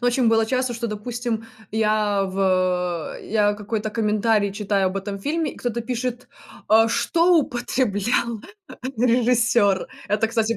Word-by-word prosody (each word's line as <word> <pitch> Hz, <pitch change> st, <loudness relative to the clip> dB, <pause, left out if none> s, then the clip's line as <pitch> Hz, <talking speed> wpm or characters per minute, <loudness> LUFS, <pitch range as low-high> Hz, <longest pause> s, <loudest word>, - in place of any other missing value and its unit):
Но 245 Hz, -, 0 dB
очень 245 Hz, -1 st, +3 dB
было 225 Hz, 0 st, +3 dB
часто, 255 Hz, +1 st, 0 dB
что, 235 Hz, 0 st, -3 dB
допустим, 225 Hz, +1 st, -4 dB, 0.3 s
я 215 Hz, -2 st, +1 dB
в 185 Hz, -3 st, 0 dB
я 205 Hz, -1 st, +1 dB
какой-то 210 Hz, +1 st, -3 dB
комментарий 215 Hz, -1 st, +1 dB
читаю 200 Hz, -1 st, 0 dB
об 185 Hz, +1 st, -2 dB
этом 200 Hz, +1 st, -4 dB
фильме, 305 Hz, +7 st, -2 dB
и -, -, -16 dB
кто-то 240 Hz, -1 st, -3 dB
пишет: 245 Hz, +1 st, -4 dB, 0.4 s
"А 225 Hz, +1 st, +5 dB
что 340 Hz, +8 st, +3 dB
употреблял 240 Hz, -4 st, 0 dB, 0.6 s
режиссер?" 230 Hz, -4 st, +2 dB, 0.2 s
Это, 210 Hz, +2 st, +1 dB
кстати, 225 Hz, -1 st, 0 dB
225 Hz, 135 wpm, -23 LUFS, 205-240 Hz, 0.6 s, А